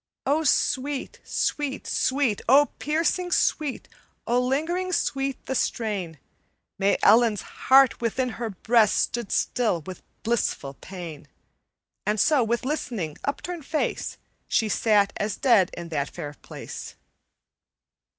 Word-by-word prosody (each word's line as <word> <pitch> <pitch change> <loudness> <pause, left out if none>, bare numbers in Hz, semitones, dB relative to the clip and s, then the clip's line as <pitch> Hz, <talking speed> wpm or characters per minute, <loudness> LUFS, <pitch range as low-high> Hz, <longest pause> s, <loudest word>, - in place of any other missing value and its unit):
"O 295 +4 +2
sweet, 280 -1 0
sweet, 290 -2 -2
sweet, 260 -6 +1
O 285 +3 +6
piercing 330 +4 0
sweet, 300 -5 0 0.4
O 240 +1 +2
lingering 325 +9 -1
sweet 275 -5 -1
the - - -2
strain! 205 -10 -2 0.6
May 200 +1 +3
Ellen's 220 -1 +5 0.3
heart 265 -2 +6
within 250 +2 0
her 230 - -1
breast 220 +2 +3
Stood 235 -4 -1
still 220 -9 +1
with 185 +4 -9 0.2
blissful 220 -11 -1
pain: 170 -2 -9 0.8
And 210 +1 0
so, 290 +2 +4
with 235 +2 -1
listening, 230 - -3
upturned 320 +2 -4
face, 310 - -2 0.3
She 220 - +1
sat 205 -2 +3
as 210 -1 -2
dead 225 -9 +4
in 170 -1 -6
that 145 -3 -2
fair 150 -4 -7
place. - - -9
235 Hz, 120 wpm, -25 LUFS, 200-280 Hz, 0.8 s, O